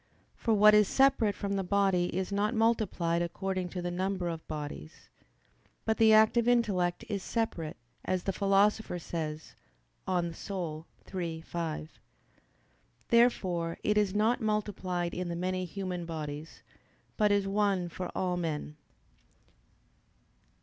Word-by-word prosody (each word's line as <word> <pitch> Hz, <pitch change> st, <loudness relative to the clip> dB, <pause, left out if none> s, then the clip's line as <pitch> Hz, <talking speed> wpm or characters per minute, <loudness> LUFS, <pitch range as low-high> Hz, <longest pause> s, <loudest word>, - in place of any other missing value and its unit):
For 225 Hz, -2 st, +1 dB
what 210 Hz, +1 st, +7 dB
is 210 Hz, -1 st, +6 dB
separate 265 Hz, -6 st, +3 dB
from 200 Hz, 0 st, -3 dB
the 195 Hz, -, -1 dB
body 195 Hz, -1 st, +2 dB
is 185 Hz, +2 st, -3 dB
not 210 Hz, +4 st, 0 dB
multiplied 215 Hz, -7 st, +1 dB
according 185 Hz, +1 st, -2 dB
to 180 Hz, 0 st, -5 dB
the 175 Hz, -, -2 dB
number 185 Hz, 0 st, -1 dB
of 165 Hz, -1 st, -6 dB
bodies. 150 Hz, +1 st, -7 dB, 0.8 s
But 220 Hz, 0 st, +1 dB
the 225 Hz, -1 st, +6 dB
active 220 Hz, +2 st, +5 dB
intellect 200 Hz, -8 st, +1 dB
is 205 Hz, -2 st, -2 dB
"separate," 185 Hz, -9 st, -2 dB, 0.3 s
as 185 Hz, -1 st, -1 dB
the 195 Hz, -, -1 dB
Philosopher 200 Hz, 0 st, +2 dB
says 160 Hz, -2 st, -5 dB, 0.5 s
(De -, -, -1 dB
Anima 170 Hz, -2 st, -3 dB, 0.3 s
iii, 170 Hz, -3 st, -3 dB
5). 160 Hz, -2 st, -5 dB, 1.1 s
Therefore 185 Hz, -9 st, +2 dB
it 210 Hz, -, +2 dB
is 205 Hz, -2 st, +2 dB
not 225 Hz, +4 st, +2 dB
multiplied 190 Hz, -5 st, -1 dB
in 180 Hz, -1 st, -3 dB
the 170 Hz, -, -3 dB
many 185 Hz, +1 st, -2 dB
human 180 Hz, -1 st, -4 dB
bodies, 155 Hz, -1 st, -6 dB, 0.5 s
but 210 Hz, -2 st, +3 dB
is 200 Hz, -1 st, +2 dB
one 195 Hz, -3 st, +1 dB
for 175 Hz, +2 st, -5 dB
all 180 Hz, -1 st, 0 dB
men. 150 Hz, -3 st, -3 dB
185 Hz, 135 wpm, -30 LUFS, 170-210 Hz, 1.1 s, what